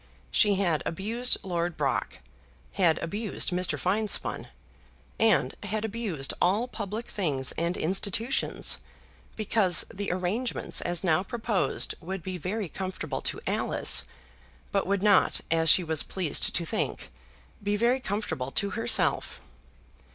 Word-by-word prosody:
She 205 -2 +4
had 175 -5 +1
abused 225 +8 +1
Lord 175 -2 -2
Brock, 140 -3 -1 0.5
had 170 -4 +2
abused 205 +3 -2
Mr. 180 +1 +2
Finespun, 205 +3 -1 0.7
and 220 -2 +3
had 210 +1 -3
abused 205 -11 -2
all 205 +7 +2
public 220 -1 -5
things 145 -10 +1
and 170 +2 -2
institutions, 200 +8 0 0.6
because 205 -5 +3
the 200 0 -3
arrangements 185 +8 0
as 175 0 0
now 165 -2 +3
proposed 220 0 -1
would 185 +1 -6
be 185 0 -5
very 200 +4 -3
comfortable 190 +2 -5
to - - -1
Alice, - - +3 0.7
but 195 -2 0
would 200 0 0
not, 210 -1 +3
as 165 -1 +3
she 185 - +7
was 160 -2 +1
pleased 185 -5 -1
to 170 - -1
think, 220 - -3 0.5
be 205 +1 0
very 240 +4 +2
comfortable 200 - -3
to 200 +7 -1
herself. 230 0 +1
195 Hz, 130 wpm, -27 LUFS, 175-215 Hz, 0.7 s, she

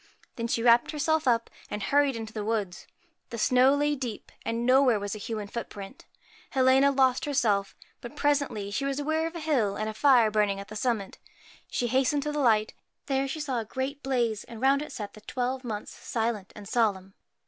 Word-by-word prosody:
Then 230 -1 -3
she 230 0 -1
wrapped 240 0 +5
herself 315 -1 0
up, 230 -2 +2 0.2
and 210 -1 -4
hurried 285 +2 +2
into 220 -1 -6
the 215 - -4
wood. 210 -4 -1 0.5
The 235 - -6
snow 255 +4 +4
lay 295 +1 +1
deep, 245 -6 -6
and 230 +1 -2
nowhere 255 -3 +5
was 205 0 -4
a 215 - -6
human 215 0 -4
footprint 200 -3 -8 0.4
Helena 265 +1 +4
lost 260 -2 +2
herself; 215 -9 +1 0.3
but 240 +4 -9
presently 280 -9 0
she 275 - -2
was 275 0 -1
aware 315 +2 0
of 330 - -8
a - - -4
hill, 260 -11 +1
and 215 +1 -2
a 220 - -3
fire 240 -2 +4
burning 205 -2 +1
at 200 - -9
the 215 - -8
summit. 215 -3 -2 0.5
She 245 - -1
hastened 265 +4 +1
to 300 - -2
the 295 - -2
light. 220 -5 +3 0.3
There 270 0 0
she 275 +4 -4
saw 270 -5 -2
a 225 - -4
great 265 +5 -4
blaze, 240 -5 0
and 230 -2 -10
round 270 +3 +3
it 300 - -7
sat 205 -3 -6
the 215 - -13
twelve 255 +4 -3
Months, 215 -4 -5
silent 225 -5 -3
and 205 -1 -10
solemn. 195 -5 0
240 Hz, 205 wpm, -27 LUFS, 215-275 Hz, 0.5 s, wrapped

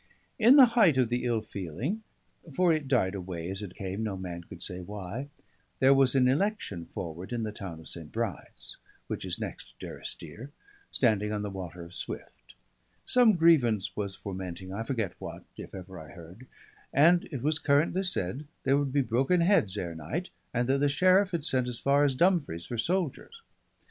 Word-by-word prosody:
In 235 +5 +7
the 275 -3 +10
height 200 - +5
of 125 -3 +3
the 120 +1 -1
ill 115 -2 +1
feeling 105 - -4 0.5
(for 175 +3 +3
it 155 -3 -2
died 115 -8 +2
away 90 -3 -5
as 95 +1 -5
it 95 -3 -8
came, 95 +2 -4
no 105 -3 -2
man 90 -2 -6
could - - -10
say 90 - -4
why) 105 +7 -6 0.5
there 135 +1 +6
was 135 -1 +4
an 130 -1 +5
election 135 - -1
forward 85 +4 -7
in 120 -2 -2
the 110 - -3
town 95 -6 -7
of 80 - -12
St. 80 -3 +1
Bride's, 115 -6 -4 0.3
which - - -5
is - - -1
the - - -3
next - - -10
to - - -7
Durrisdeer, 130 +6 -2 0.4
standing 105 -4 +2
on 105 -1 -2
the 105 - -4
Water 90 -2 -7
of 85 +1 -12
Swift; - - -7 0.5
some 245 -3 +5
grievance 135 - +3
was 100 -2 -1
fermenting, 95 -1 -6
I 105 - -3
forget 115 -5 -2
what, - - -8
if - - -9
ever 95 -1 -9
I 80 -1 -11
heard: 90 +8 -13 0.4
and 170 +5 +5
it 135 -6 -5
was 155 +2 +1
currently 155 +5 +2
said 145 - +1 0.2
there 135 +1 +3
would 140 -2 -1
be 140 0 +2
broken 130 +9 +2
heads 170 - +3
ere 85 -4 -3
night, 115 - -5 0.2
and 120 0 0
that 135 +1 +2
the 145 0 +3
sheriff 185 +7 +4
had 170 -5 -2
sent 130 -5 +1
as 125 -1 -2
far 140 +3 +3
as 140 -2 +2
Dumfries 155 - +1
for 120 - -5
soldiers. 185 - -2
120 Hz, 195 wpm, -29 LUFS, 95-145 Hz, 0.5 s, the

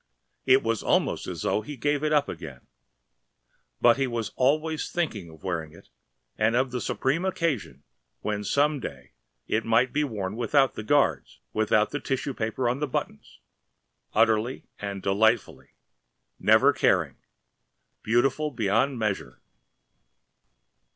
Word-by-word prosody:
It 130 +1 +5
was 115 -1 0
almost - - +1
as - - -5
though - - +1
he 140 +6 -8
gave 145 +3 0
it 155 - +1
up 145 -2 +3
again. 65 -5 -8 1.2
But 120 +1 +5
he 135 -1 +1
was 115 -3 -3
always 155 +4 0
thinking 115 - -2
of 80 -1 -16
wearing 80 -4 -3
it 85 - -17 0.5
and 110 +2 +2
of 130 +1 +1
the 125 -1 -3
supreme 140 +7 -1
occasion 170 - -2 0.4
when 105 -1 -2
some 145 +7 +1
day 70 - -8 0.3
it 110 +1 0
might 115 +3 +2
be 150 +1 +1
worn 105 -7 -4
without 130 +4 +2
the - - -6
guards, 110 - +1
without 110 0 +2
the 145 - -2
tissue 135 0 -2
paper 115 +2 -2
on 125 +3 0
the 150 - -1
buttons, 125 - -5 0.7
utterly 110 +3 +1
and 100 -1 -5
delightfully, 110 +3 +1 0.6
never - - +5
caring, - - +1 0.8
beautiful 135 +7 +1
beyond 120 +2 +1
measure. 105 -3 -3
120 Hz, 135 wpm, -26 LUFS, 105-140 Hz, 1.2 s, It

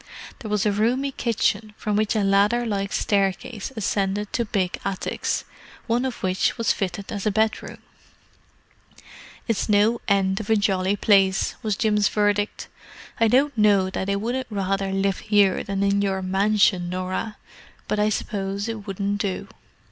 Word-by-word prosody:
There 220 - -7
was 210 -1 0
a 210 - +3
roomy 245 +7 +1
kitchen, 225 -3 -1
from 210 -1 -2
which 215 +1 +1
a 215 - +2
ladder 205 +5 +3
like 200 -3 -2
staircase 200 +3 -1
ascended 200 -1 -1
to 235 - 0
big 195 -4 -1
attics, 195 -1 -2 0.4
one 240 +2 0
of 255 -2 -5
which 185 +4 +1
was 230 - +2
fitted 195 0 -4
as 205 0 -3
a - - +3
bedroom. 220 +2 -1 1.7
"It's 230 -1 -1
no 210 +3 +3
end 195 -1 +2
of 220 - -7
a 220 - +5
jolly 195 -1 +1
place," 195 -2 +3
was 215 -2 -1
Jim's 210 -2 +2
verdict. 205 0 0 0.5
"I 225 - +4
don't 275 +5 +3
know 200 -3 +3
that 190 0 -3
I 200 - +1
wouldn't 245 +5 -2
rather 195 -1 -1
live 195 0 0
here 205 -3 +2
than 195 0 -2
in 200 0 +2
your 190 -1 -1
mansion, 190 -1 +2
Norah; 185 +4 -3 0.5
but 210 - -1
I 210 +1 +3
suppose 200 -1 -3
it 220 -2 -6
wouldn't 200 +1 -2
do." 195 -3 -3
205 Hz, 160 wpm, -23 LUFS, 195-215 Hz, 1.7 s, a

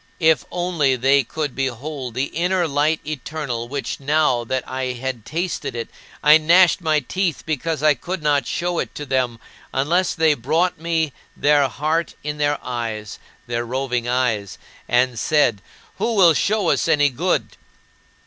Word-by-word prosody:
If 160 -2 +3
only 175 -7 +1
they 135 +2 +3
could 150 +2 -4
behold 135 -1 -4
the 130 +2 -1
inner 180 +1 +1
Light 150 +2 +1
Eternal 145 -5 -4
which, 140 +2 -4
now 140 -3 +2
that 130 +2 -3
I 130 -1 -3
had 125 -2 -5
tasted 170 -4 -3
it, 115 -1 -4 0.3
I 150 +1 +7
gnashed 175 +3 +5
my 155 -2 +2
teeth 180 +4 -2
because 155 0 -2
I 155 -1 +6
could 180 +3 -6
not 145 -4 +2
show 175 0 -1
it - - -4
to 145 - -5
them 125 -4 -1 0.3
unless 170 +7 +1
they 160 -1 +4
brought 155 +7 0
me 160 -3 -1 0.2
their 145 -1 +4
heart 155 +5 -1
in 150 0 -4
their 145 0 +1
eyes 115 -4 -4 0.3
their 120 -1 -2
roving 125 -1 -2
eyes 115 -5 0 0.3
and 120 -1 +2
said, 125 -10 +2 0.4
"Who 230 -1 0
will 180 -5 +6
show 205 +2 +1
us - - +1
any 145 -3 +4
good?" 120 - -1
145 Hz, 160 wpm, -21 LUFS, 125-160 Hz, 0.4 s, I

